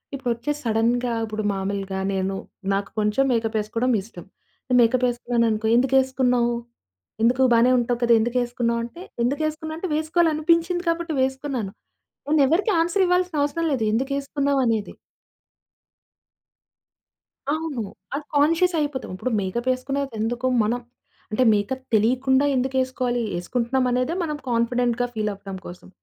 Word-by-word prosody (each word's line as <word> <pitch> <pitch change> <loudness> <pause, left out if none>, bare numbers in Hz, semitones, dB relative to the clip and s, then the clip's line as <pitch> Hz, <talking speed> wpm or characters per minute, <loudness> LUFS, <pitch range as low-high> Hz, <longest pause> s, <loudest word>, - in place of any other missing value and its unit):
ఇప్పుడొచ్చేసి 265 +3 -2
సడెన్‌గా 235 +2 +1
ఇప్పుడు 215 0 -4
మామూలుగా 195 0 -3
నేను 190 0 -1 0.4
నాకు 195 0 -1
కొంచెం 210 +6 +2
మేకప్ 225 -1 0
ఏసుకోవడం 230 +4 -1
ఇష్టం. 185 -5 -12 0.6
మేకప్ 250 +2 +3
ఏసుకున్నాననుకో, 230 -2 0
"ఎందుకేసుకున్నావు? 260 -2 +2 0.7
ఎందుకు? 250 +3 +3
బానే 235 +2 +5
ఉంటావు 240 0 -1
కదా! 235 0 +5
ఎందుకేసుకున్నావు?" 240 0 0
అంటే, 340 +9 -11 0.2
ఎందుకేసుకున్నా 310 +4 -2
అంటే 370 - -3
వేసుకోవాలి 320 +1 +2
అనిపించింది 335 +3 +1
కాబట్టి 335 -2 -1
వేసుకున్నాను. 265 -6 -2 0.6
నేను 300 -2 +4
ఎవ్వరికీ 390 - +2
ఆన్స‌ర్ 350 +4 +2
ఇవ్వాల్సిన 360 -2 +1
అవసరం 330 +3 -1
లేదు. 235 -4 -1
ఎందుకేసుకున్నావనేది. 275 -3 0 2.6
అవును. 310 -7 -2 0.3
అది 290 +1 -3
కాన్షియస్ 330 +5 +3
అయిపోతాం. 285 -7 -3
ఇప్పుడు 255 +7 -3
మేకప్ 235 +7 -3
ఎసుకునేది 270 +1 -3
ఎందుకు 240 +3 -1 0.2
మనం 235 +3 0 0.5
అంటే 250 +4 +2
మేకప్ 235 +6 -1
తెలియకుండా 260 +5 +3
ఎందుకేసుకోవాలి. 255 -2 0 0.2
ఏసుకుంటున్నాం 250 +7 0
అనేదే 255 +6 0
మనం 300 -3 -2
కాన్ఫిడెంట్‌గా 240 +1 +1
ఫీల్ 215 -1 -1
అవ్వడం 195 -1 -8
కోసం. 175 +1 -10
250 Hz, 120 wpm, -23 LUFS, 230-285 Hz, 2.6 s, బానే